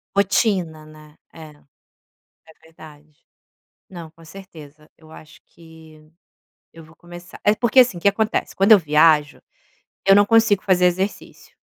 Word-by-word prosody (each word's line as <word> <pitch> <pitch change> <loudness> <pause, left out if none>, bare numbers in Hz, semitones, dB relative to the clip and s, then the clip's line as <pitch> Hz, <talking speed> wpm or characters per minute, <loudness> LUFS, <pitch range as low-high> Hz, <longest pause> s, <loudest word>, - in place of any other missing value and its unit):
Rotina, 190 -5 -2
né. 155 0 -19 0.2
É, 160 -2 -14
é 145 -2 -29 0.8
verdade. 155 -2 -19 0.7
Não, 170 -4 -12
com 165 +1 -22
certeza, 155 -4 -16
eu 160 -1 -21
acho 155 0 -17
que 160 -2 -20 0.6
eu 165 -1 -16
vou 160 +1 -22
começar. 175 +1 -15
É 210 - +2
porque 240 +3 +2
assim, 240 -8 0
que 185 - +1
acontece. 215 +2 -3
Quando 195 +3 +2
eu 215 - +7
viajo, 150 -2 0 0.7
eu 195 - +5
não 205 +1 +4
consigo 225 -3 +1
fazer 180 -2 +1
exercício. 190 +3 -6
165 Hz, 140 wpm, -19 LUFS, 155-195 Hz, 0.8 s, eu